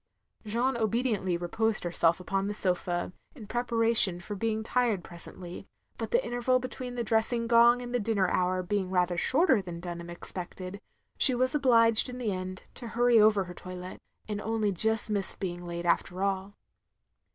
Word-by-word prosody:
Jeanne 240 +4 0
obediently 220 -5 0
reposed 220 +6 -1
herself 170 0 +2
upon 195 +2 -2
the 205 - -3
sofa, 180 -2 -1 0.2
in 230 -7 -10
preparation 230 -5 +2
for 175 +4 -7
being 220 +1 -1
tired 230 -5 0
presently; 175 0 -10 0.3
but - - -3
the 485 +1 +1
interval 245 +1 +1
between 255 0 -6
the 240 - -2
dressing 230 +1 +1
gong 235 +1 +5
and 245 0 -7
the 245 - +2
dinner 205 -3 +1
hour 185 0 0
being 190 0 -2 0.3
shorter 265 - +3
than 175 -3 -7
Dtmham 170 -1 -7
expected, 185 +2 -6 0.4
she 260 - +6
was 255 +3 +1
obliged, 235 -5 +5
in 250 - -7
the 235 -4 -2
end, 185 0 -5
to 240 - -7
hurry 240 0 +3
over 210 -2 +5
her 180 -1 -9
toilette; 185 0 -9 0.3
and 210 -1 -3
only 220 -2 0
just 220 +4 -1
missed 200 -2 -2
being 175 -2 -4
late 170 0 -5
after 180 +2 0
all. 195 0 -2
210 Hz, 165 wpm, -29 LUFS, 185-235 Hz, 0.4 s, she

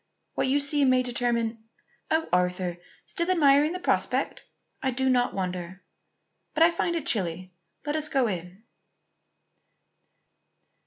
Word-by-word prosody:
What - - 0
you 275 +2 +2
see 285 0 +2
may 255 -1 +4
determine 235 -2 -1 0.5
oh, 320 0 +1
Arthur! 180 -1 0 0.3
still 340 +1 -2
admiring 295 -3 +4
the 365 - -4
prospect? 355 - 0 0.4
I 265 - 0
do 265 +1 -1
not 245 -1 +1
wonder. 185 -1 -4 0.7
But 320 - +5
I 335 - +6
find 340 0 -1
it 330 - -3
chilly. 185 -3 -1 0.3
Let 295 0 -1
us 310 -1 -1
go 270 -4 +2
in." 185 0 -5
250 Hz, 135 wpm, -26 LUFS, 185-295 Hz, 0.7 s, I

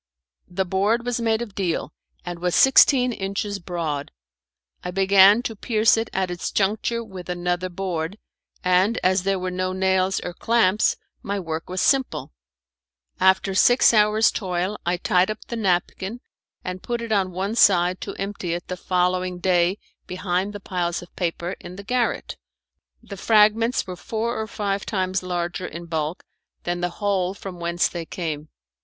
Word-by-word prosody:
The 190 +2 -2
board 205 +6 +1
was 245 -1 -1
made 225 0 +1
of 215 -4 -10
deal, 175 -5 -2 0.3
and 175 -1 -5
was 180 0 0
sixteen 265 -2 +6
inches 200 0 -3
broad. 165 -5 -3 0.7
I 180 - -4
began 195 +4 +5
to 225 - -4
pierce 220 +1 +3
it 225 0 -2
at 190 -1 -1
its 175 - -3
juncture 220 +4 0
with 190 -5 -10
another 180 +1 -1
board, 180 0 -3 0.5
and 185 +5 +3
as 185 +1 +3
there 195 +1 0
were 185 0 -3
no 185 0 -2
nails 190 0 +1
or 175 - -5
clamps 215 -1 +2 0.2
my 200 0 -3
work 165 -2 -5
was 185 0 -2
simple. 270 -2 +1 0.9
After 190 +1 +3
six 245 +5 +5
hours' 215 +1 +4
toil 185 0 -2
I 175 +1 +1
tied 180 +2 +2
up 215 0 -5
the 235 - -5
napkin, 195 +1 -1 0.4
and 185 0 -5
put 235 -1 -3
it 230 - -6
on 195 -3 +2
one 190 +4 -2
side 185 -5 +4
to - - -5
empty 195 -4 -3
it 175 - -8
the 180 - -3
following 180 0 0
day 180 +1 +2 0.3
behind 185 +1 -2
the 205 - -7
pile 180 -3 -2
of 175 0 -7
papers 175 +1 -3
in 180 - -10
the 200 - -9
garret. 245 +1 -1 0.7
The 200 - -9
fragments 220 +4 +3
were 185 -2 -6
four 225 +5 -3
or 220 - -4
five 200 -3 -2
times 190 -2 -1
larger 180 0 -3
in 170 +2 -8
bulk 160 0 -3 0.4
than 175 0 -2
the 175 - 0 0.2
hole 190 -2 +1
from 190 -3 -8
whence 170 0 +1
they 170 -2 -6
came. 155 -3 -5
190 Hz, 165 wpm, -23 LUFS, 180-210 Hz, 0.9 s, sixteen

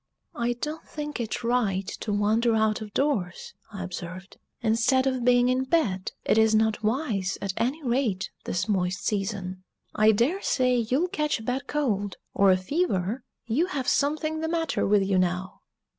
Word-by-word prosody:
"I 240 +1 0
don't 300 +6 -5
think 295 -2 -5
it 235 0 -3
right 220 -6 +1
to 215 - -4
wander 220 +3 +2
out 220 0 +1
of 210 -1 -7
doors," 205 -10 -1 0.2
I 195 -2 -5
observed, 185 +1 -7 0.3
"instead 240 +4 +3
of 260 -2 0
being 245 0 +4
in 255 +1 +2
bed; 240 - 0
it 220 - +3
is 220 0 +4
not 220 -1 +2
wise, 215 -5 -1
at 195 -1 -3
any 275 +7 -1
rate, 235 -7 0
this 185 +3 -1
moist 185 -3 -1
season. 195 -3 -2 0.3
I 215 +1 +5
daresay 255 - +1
you'll 255 +10 +1
catch 300 - 0
a - - -9
bad 260 +4 -2
cold, 205 -9 -1 0.2
or 200 0 +4
a 185 - +4
fever 215 - -1 0.2
you 270 +10 +1
have 275 -8 -3
something 310 +2 +1
the 320 - -2
matter 330 -2 0
with 205 0 +4
you 190 -1 +2
now!" 180 +1 -2
225 Hz, 170 wpm, -26 LUFS, 195-270 Hz, 0.3 s, I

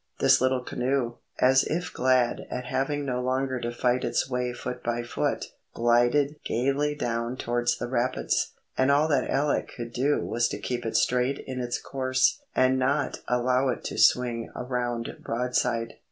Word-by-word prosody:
The - - +5
little 130 -1 +1
canoe, 125 -1 -1 0.2
as 130 +1 +5
if 175 +3 -3
glad 125 -1 +2
at 125 0 -4
having 140 +3 -1
no 125 -2 -1
longer 130 0 -1
to 120 0 -3
fight 125 +1 +1
its - - 0
way 125 -1 -1
foot 125 0 -6
by 120 0 -1
foot, 120 - -1 0.3
glided 120 +5 +3
gaily 140 +5 0
down 120 -2 -2
towards 120 0 0
the 120 - -4
rapids, 125 +1 0 0.2
and 130 +1 +2
all 145 +2 +4
that 140 -4 +1
Alec 145 +1 0
could 120 -1 -6
do 140 +4 +1
was 120 +1 +1
to - - -4
keep 120 -2 -3
it 110 - +1
straight 125 +2 +2
in 130 -1 -5
its 120 0 -2
course, 130 - +1
and 130 0 +3
not 140 +3 0
allow 125 +2 +2
it 125 - -3
to - - -4
swing 120 -2 +3
around 120 -2 -3
broadside. 120 -1 -1
125 Hz, 170 wpm, -27 LUFS, 120-130 Hz, 0.3 s, The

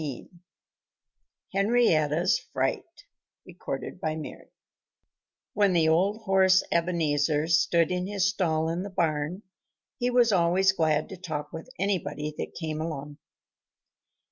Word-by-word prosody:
XV 140 -5 -6 1.2
HENRIETTA'S 185 -7 +2
FRIGHT - - -3 2.5
When 200 -2 +3
the 160 -2 +3
old 195 +7 +1
horse 190 -1 +4
Ebenezer 155 -3 +1
stood 170 -1 +2
in 180 0 -2
his 200 -1 0
stall 165 -5 0
in 170 +2 -2
the 200 - -5
barn 165 +1 -1 0.6
he 245 0 +1
was 245 -2 +4
always 185 +1 +3
glad 155 -4 +1
to 190 - -8
talk 155 -5 -6
with 160 +9 -8
anybody 150 -6 -2
that - - -5
came 155 -2 -3
along. 150 -2 -6
170 Hz, 110 wpm, -27 LUFS, 155-195 Hz, 2.5 s, horse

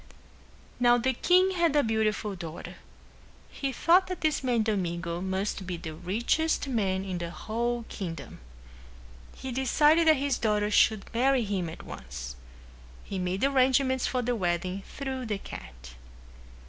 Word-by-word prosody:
Now 245 0 +5
the 260 +2 +1
king 365 +8 +4
had 340 -5 +1
a 290 - +5
beautiful 220 -2 0
daughter. 170 -2 -8 0.7
He 275 -1 -3
thought 345 +8 +4
that 365 -1 -5
this 310 -3 +1
man 240 -3 +2
Domingo 175 -5 -2
must 190 0 -2
be 180 -1 -3
the 160 -1 -7
richest 230 - 0
man 195 -7 0
in 185 -2 -3
the 170 0 -4
whole 235 +5 -2
kingdom. 165 -7 -6 1.0
He 265 - -6
decided 295 +6 +3
that 315 - +7
his 275 -1 0
daughter 210 -2 +1
should 215 -1 +4
marry 255 +1 +3
him 195 -5 -2
at 160 - -9
once. 65 -2 -8 0.7
He 195 - -5
made 180 +3 -2
arrangements 260 -1 +3
for 250 -1 -1
the 245 +1 0
wedding 180 -1 -1
through 265 -3 -5
the 210 -2 -1
cat. - - -10
220 Hz, 145 wpm, -28 LUFS, 185-265 Hz, 1.0 s, that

